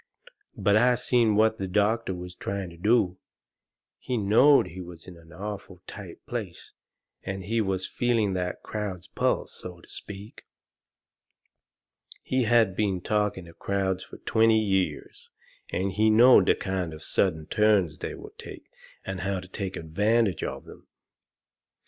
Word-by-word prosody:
But 100 Hz, -, +3 dB
I 125 Hz, +2 st, +4 dB
seen 120 Hz, -3 st, +2 dB
what 110 Hz, +1 st, +3 dB
the 95 Hz, -, -2 dB
doctor 105 Hz, +1 st, +1 dB
was 90 Hz, 0 st, -8 dB
trying 95 Hz, -1 st, -4 dB
to -, -, -13 dB
do. 95 Hz, -2 st, +2 dB, 0.8 s
He 125 Hz, -, -2 dB
knowed 115 Hz, +8 st, +5 dB
he 90 Hz, +3 st, -8 dB
was 85 Hz, -2 st, -11 dB
in 90 Hz, -, -11 dB
an 85 Hz, -1 st, -17 dB
awful 95 Hz, 0 st, -7 dB
tight -, -, -10 dB
place, -, -, -6 dB, 0.5 s
and 95 Hz, 0 st, -5 dB
he 115 Hz, +4 st, 0 dB
was 95 Hz, -2 st, -1 dB
feeling 115 Hz, -4 st, 0 dB
that 90 Hz, -1 st, -3 dB
crowd's 100 Hz, -4 st, -5 dB
pulse, -, -, -1 dB
so 90 Hz, -1 st, -8 dB
to -, -, -18 dB
speak. 105 Hz, +1 st, -9 dB, 1.8 s
He 130 Hz, -2 st, 0 dB
had 110 Hz, -4 st, +3 dB
been 95 Hz, -4 st, 0 dB
talking 105 Hz, -3 st, -1 dB
to 85 Hz, -, -13 dB
crowds 95 Hz, 0 st, -1 dB
fur -, -, -12 dB
twenty 110 Hz, 0 st, +4 dB
years, 95 Hz, -3 st, -2 dB, 0.4 s
and 95 Hz, +1 st, -1 dB
he 110 Hz, +3 st, +3 dB
knowed 120 Hz, +4 st, +7 dB
the -, -, +5 dB
kind 95 Hz, -4 st, -3 dB
of 75 Hz, -, -11 dB
sudden 80 Hz, -1 st, 0 dB
turns 100 Hz, -6 st, +2 dB
they -, -, -5 dB
will -, -, -11 dB
take, -, -, -11 dB, 0.3 s
and 95 Hz, -1 st, -4 dB
how 95 Hz, +2 st, -1 dB
to 90 Hz, -, -10 dB
take 95 Hz, 0 st, -5 dB
advantage 105 Hz, +4 st, +1 dB
of -, -, -5 dB
'em. -, -, -14 dB
100 Hz, 155 wpm, -27 LUFS, 90-110 Hz, 1.8 s, knowed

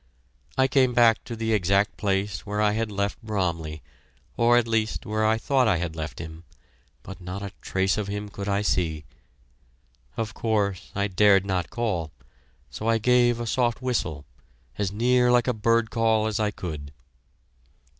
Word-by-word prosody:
I 130 Hz, 0 st, +4 dB
came 130 Hz, -2 st, +2 dB
back 115 Hz, -2 st, +5 dB
to 120 Hz, -1 st, -6 dB
the 110 Hz, 0 st, -1 dB
exact 100 Hz, +1 st, +2 dB
place 100 Hz, -3 st, -1 dB
where 105 Hz, 0 st, -3 dB
I 105 Hz, -1 st, +3 dB
had 110 Hz, 0 st, -2 dB
left 100 Hz, 0 st, -2 dB
Bromley, 85 Hz, -, -3 dB, 0.5 s
or 120 Hz, +1 st, +4 dB
at 120 Hz, -1 st, +2 dB
least 110 Hz, -1 st, -1 dB
where 110 Hz, +1 st, -1 dB
I 110 Hz, +1 st, +3 dB
thought 130 Hz, +1 st, +2 dB
I 105 Hz, -, +3 dB
had 85 Hz, -2 st, -3 dB
left 80 Hz, 0 st, -5 dB
him, 80 Hz, 0 st, -8 dB, 0.6 s
but 95 Hz, 0 st, -10 dB
not 90 Hz, +3 st, -6 dB
a 100 Hz, -, -5 dB
trace 95 Hz, +1 st, 0 dB
of 105 Hz, -, -3 dB
him 105 Hz, +1 st, -4 dB
could 100 Hz, 0 st, -6 dB
I 100 Hz, +1 st, +1 dB
see. 80 Hz, -6 st, 0 dB, 1.1 s
Of 110 Hz, -2 st, -3 dB
course, 100 Hz, -5 st, -1 dB
I 100 Hz, 0 st, +1 dB
dared 100 Hz, 0 st, +4 dB
not 95 Hz, -3 st, -1 dB
call, 105 Hz, -9 st, -2 dB, 0.6 s
so 110 Hz, -, -5 dB
I 115 Hz, 0 st, +3 dB
gave 120 Hz, +1 st, +3 dB
a 120 Hz, -, -3 dB
soft 120 Hz, 0 st, 0 dB
whistle, 100 Hz, -, -2 dB, 0.5 s
as 100 Hz, -2 st, -1 dB
near 125 Hz, +3 st, +3 dB
like 120 Hz, 0 st, +3 dB
a 125 Hz, -, +2 dB
bird 115 Hz, +1 st, +1 dB
call 110 Hz, -2 st, +2 dB
as 110 Hz, 0 st, -1 dB
I 105 Hz, -1 st, +1 dB
could. 80 Hz, -8 st, -6 dB
105 Hz, 175 wpm, -25 LUFS, 95-115 Hz, 1.1 s, back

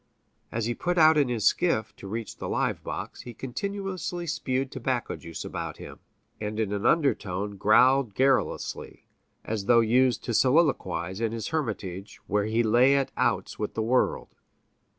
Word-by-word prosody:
As 115 Hz, -1 st, -2 dB
he 120 Hz, -, 0 dB
put 175 Hz, +9 st, -2 dB
out 160 Hz, -1 st, +7 dB
in 145 Hz, -4 st, +3 dB
his 115 Hz, -4 st, -1 dB
skiff 165 Hz, -, +1 dB
to 100 Hz, -, -9 dB
reach 110 Hz, +2 st, -5 dB
the -, -, -5 dB
live -, -, -1 dB
box, -, -, -6 dB
he 120 Hz, -2 st, -10 dB
continuously 185 Hz, -, -4 dB
spewed 135 Hz, -5 st, -2 dB
tobacco 130 Hz, -1 st, -2 dB
juice 85 Hz, -1 st, -8 dB
about -, -, -5 dB
him, -, -, -10 dB, 0.4 s
and 105 Hz, 0 st, -4 dB
in 105 Hz, -2 st, -1 dB
an 100 Hz, 0 st, 0 dB
undertone 105 Hz, -, 0 dB
growled 120 Hz, +3 st, +4 dB
garrulously, 135 Hz, 0 st, 0 dB, 0.4 s
as 105 Hz, -3 st, -3 dB
though 120 Hz, +1 st, +5 dB
used 125 Hz, +2 st, +2 dB
to 120 Hz, -, -3 dB
soliloquize 110 Hz, -, +1 dB
in 115 Hz, -1 st, 0 dB
his 115 Hz, -2 st, -4 dB
hermitage, 105 Hz, -, -4 dB
where 105 Hz, +1 st, 0 dB
he 110 Hz, +2 st, +1 dB
lay 125 Hz, +5 st, +4 dB
at 140 Hz, -1 st, 0 dB
outs -, -, -1 dB
with 105 Hz, -, -3 dB
the 110 Hz, -, 0 dB
world. 125 Hz, +3 st, +1 dB
120 Hz, 165 wpm, -27 LUFS, 105-135 Hz, 0.4 s, out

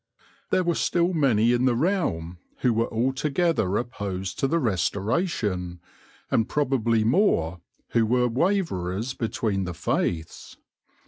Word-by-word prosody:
There 185 Hz, -, +2 dB
were 170 Hz, -1 st, +1 dB
still 175 Hz, +2 st, +1 dB
many 120 Hz, -7 st, +3 dB
in 120 Hz, +1 st, +2 dB
the 125 Hz, -2 st, +3 dB
realm 115 Hz, -, -1 dB, 0.2 s
who 125 Hz, -2 st, +3 dB
were 115 Hz, +1 st, 0 dB
altogether 135 Hz, -, 0 dB
opposed 100 Hz, -6 st, -4 dB
to 135 Hz, -, +2 dB
the 165 Hz, -, +1 dB
Restoration, 100 Hz, -, -1 dB, 0.5 s
and 110 Hz, -, +2 dB
probably 120 Hz, -6 st, +1 dB
more 100 Hz, -, +2 dB, 0.3 s
who 115 Hz, -2 st, +2 dB
were 125 Hz, +1 st, +2 dB
waverers 120 Hz, -, -1 dB
between 110 Hz, -5 st, -2 dB
the 90 Hz, -1 st, -5 dB
faiths. 80 Hz, -1 st, -3 dB
115 Hz, 125 wpm, -25 LUFS, 95-140 Hz, 0.5 s, many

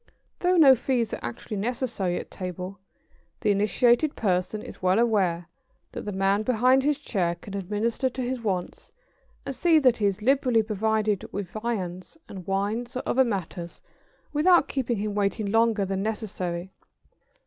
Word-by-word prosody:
Though 360 Hz, 0 st, +2 dB
no 285 Hz, -5 st, +8 dB
fees 245 Hz, -2 st, 0 dB
are -, -, -3 dB
actually 120 Hz, -, -5 dB
necessary 225 Hz, -5 st, -2 dB
at -, -, -10 dB
table, 185 Hz, +1 st, -6 dB, 0.6 s
the 210 Hz, -, +3 dB
initiated 235 Hz, -, +2 dB
person 195 Hz, +1 st, -1 dB
is -, -, -10 dB
well 185 Hz, +1 st, +3 dB
aware 190 Hz, -7 st, +1 dB, 0.4 s
that -, -, -7 dB
the 205 Hz, -, -3 dB
man 195 Hz, +1 st, +1 dB
behind 255 Hz, +3 st, +3 dB
his 295 Hz, 0 st, +2 dB
chair 185 Hz, -12 st, -1 dB
can 195 Hz, +3 st, -11 dB
administer 210 Hz, +7 st, -1 dB
to 255 Hz, -, -5 dB
his 250 Hz, 0 st, -3 dB
wants 190 Hz, -5 st, -3 dB, 0.5 s
and 275 Hz, -, -4 dB
see 335 Hz, +2 st, +4 dB
that 255 Hz, -5 st, +4 dB
he 205 Hz, -, +2 dB
is 200 Hz, +1 st, -2 dB
liberally 255 Hz, -3 st, +3 dB
provided 215 Hz, -1 st, -1 dB
with 200 Hz, -2 st, -5 dB
viands 210 Hz, -, -4 dB
and 185 Hz, -3 st, -9 dB
wines 210 Hz, +6 st, -2 dB
or -, -, -3 dB
other 265 Hz, -, +3 dB
matters 185 Hz, -6 st, -5 dB, 0.5 s
without 335 Hz, +2 st, +4 dB
keeping 250 Hz, -4 st, -1 dB
him 210 Hz, +1 st, -2 dB
waiting 205 Hz, 0 st, -1 dB
longer 225 Hz, -2 st, +3 dB
than 195 Hz, 0 st, -2 dB
necessary. 190 Hz, -4 st, -4 dB
215 Hz, 160 wpm, -26 LUFS, 195-245 Hz, 0.6 s, no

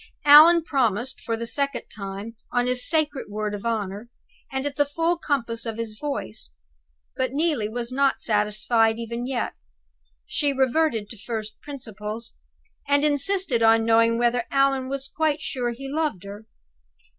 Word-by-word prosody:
Allan 315 Hz, +4 st, +9 dB
promised 255 Hz, -3 st, -1 dB
for 230 Hz, -2 st, -2 dB
the 230 Hz, -, -4 dB
second 280 Hz, +2 st, -1 dB
time, 200 Hz, +2 st, -7 dB, 0.2 s
on 245 Hz, 0 st, +1 dB
his 250 Hz, 0 st, +1 dB
sacred 305 Hz, -3 st, 0 dB
word 210 Hz, 0 st, -3 dB
of 205 Hz, +3 st, -4 dB
honor, 210 Hz, 0 st, -3 dB, 0.4 s
and 265 Hz, +1 st, -2 dB
at 285 Hz, -1 st, -3 dB
the 290 Hz, -, +3 dB
full 330 Hz, +4 st, 0 dB
compass 245 Hz, -8 st, -2 dB
of 225 Hz, -2 st, -5 dB
his 225 Hz, -2 st, -5 dB
voice. 275 Hz, -, -4 dB, 0.7 s
But 260 Hz, -1 st, -1 dB
Neelie 290 Hz, -8 st, 0 dB
was 235 Hz, +2 st, -5 dB
not 275 Hz, +1 st, +2 dB
satisfied 220 Hz, +1 st, +1 dB
even 235 Hz, +1 st, -4 dB
yet. 260 Hz, -3 st, -2 dB, 0.7 s
She 290 Hz, -2 st, 0 dB
reverted 265 Hz, -4 st, +1 dB
to 230 Hz, -, -9 dB
first 215 Hz, 0 st, -5 dB
principles, 225 Hz, -5 st, -7 dB, 0.5 s
and 285 Hz, +1 st, +3 dB
insisted 300 Hz, -3 st, +2 dB
on 225 Hz, 0 st, +5 dB
knowing 230 Hz, 0 st, +4 dB
whether 240 Hz, 0 st, +1 dB
Allan 275 Hz, -1 st, +2 dB
was 275 Hz, 0 st, -4 dB
quite 310 Hz, +1 st, 0 dB
sure 255 Hz, -5 st, -3 dB
he 255 Hz, +3 st, -6 dB
loved 295 Hz, -, -2 dB
her. 205 Hz, +2 st, -10 dB
245 Hz, 155 wpm, -24 LUFS, 225-285 Hz, 0.7 s, Allan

